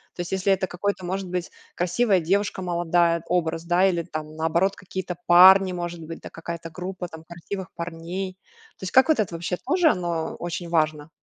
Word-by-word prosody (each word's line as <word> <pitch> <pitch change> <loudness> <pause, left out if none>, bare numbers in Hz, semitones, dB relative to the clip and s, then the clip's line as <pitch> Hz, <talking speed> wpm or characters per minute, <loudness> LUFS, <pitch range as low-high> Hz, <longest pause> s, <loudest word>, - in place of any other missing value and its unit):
То - - -4
есть, 175 - -6
если 190 +1 +2
это 190 0 -1
какой-то, 185 +1 -3
может 190 +1 -3
быть, 180 -1 -3 0.2
красивая 190 +2 +2
девушка 195 +3 0
молодая, 170 -1 +1
образ, 165 -2 0
да, 175 +2 +3
или 170 -3 0
там, 155 -2 -7
наоборот, 170 +5 +1
какие-то 185 -1 -5
парни, 185 +2 +8
может 175 -1 -4
быть, 165 +1 -8
да, - - -8
какая-то 165 0 -7
группа 180 +2 -6
там 160 -2 -11
красивых 175 +3 -7
парней. 170 +3 -5 0.4
То - - -14
есть, 185 - -4
как 260 +5 +6
вот 310 -7 +4
это 195 -5 0
вообще 175 +2 -3
тоже, 330 - +2
оно 170 - -1
очень 175 0 -4
важно? 155 -2 0
175 Hz, 185 wpm, -24 LUFS, 170-190 Hz, 0.4 s, парни